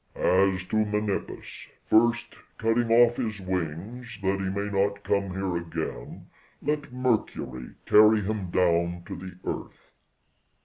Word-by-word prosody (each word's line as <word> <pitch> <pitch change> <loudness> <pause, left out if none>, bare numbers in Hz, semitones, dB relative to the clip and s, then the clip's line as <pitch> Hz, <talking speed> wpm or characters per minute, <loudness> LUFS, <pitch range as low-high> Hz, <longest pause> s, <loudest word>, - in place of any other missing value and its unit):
"As 95 0 +2
to 110 - -2
Menippus, 105 -1 -2 0.2
first 120 +2 +3 0.2
cutting 115 +1 +1
off 120 +1 +6
his 110 -3 -2
wings 95 +7 -4
that 95 0 +1
he 95 -1 -1
may 100 +1 -3
not 100 +1 0
come 100 -1 0
here 95 -1 -2
again, 80 -7 -6 0.3
let 145 -2 -2
Mercury 110 - -2
carry 105 0 +6
him 100 -2 -3
down 85 -1 +1
to - - -6
the 90 0 -9
earth." - - -6
100 Hz, 130 wpm, -27 LUFS, 90-110 Hz, 0.3 s, off